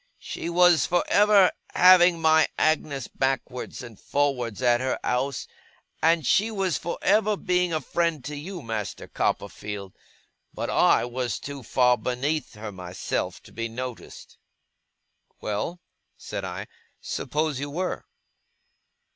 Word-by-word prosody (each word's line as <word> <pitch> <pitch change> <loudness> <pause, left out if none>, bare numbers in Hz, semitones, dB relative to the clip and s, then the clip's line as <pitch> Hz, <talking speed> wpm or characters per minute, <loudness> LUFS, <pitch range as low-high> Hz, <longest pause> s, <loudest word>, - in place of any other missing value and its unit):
She 170 - -6
was 175 -2 +5
for 175 0 +2
ever 205 -2 +6 0.2
having 180 -1 +7
my 160 -1 +5
Agnes 145 -4 0
backwards 130 -1 -3
and 115 -5 -11
forwards 135 -6 -1
at 120 0 +4
her 130 0 0
ouse, 130 +2 -1 0.6
and 165 -2 +3
she 210 - +3
was 195 -6 -1
for 170 - -3
ever 210 +1 +3
being 180 -2 +1
a 160 - 0
friend 160 -1 -1
to 150 - -5
you, 170 +3 -7
Master 110 -3 -4
Copperfield; 100 -2 -3 0.6
but - - -3
I - - +4
was 120 -2 -3
too 140 -1 -7
far 125 0 +3
beneath 135 +6 -2
her, 105 0 -7
myself, 90 -1 -4
to - - -15
be 115 +1 -3
noticed.' 125 +1 -8 1.0
'Well?' 110 +12 -3 0.4
said - - -6
I; - - -5 0.3
'suppose 150 -2 -2
you 145 +1 -4
were! 180 +5 -3
145 Hz, 130 wpm, -25 LUFS, 125-175 Hz, 1.0 s, having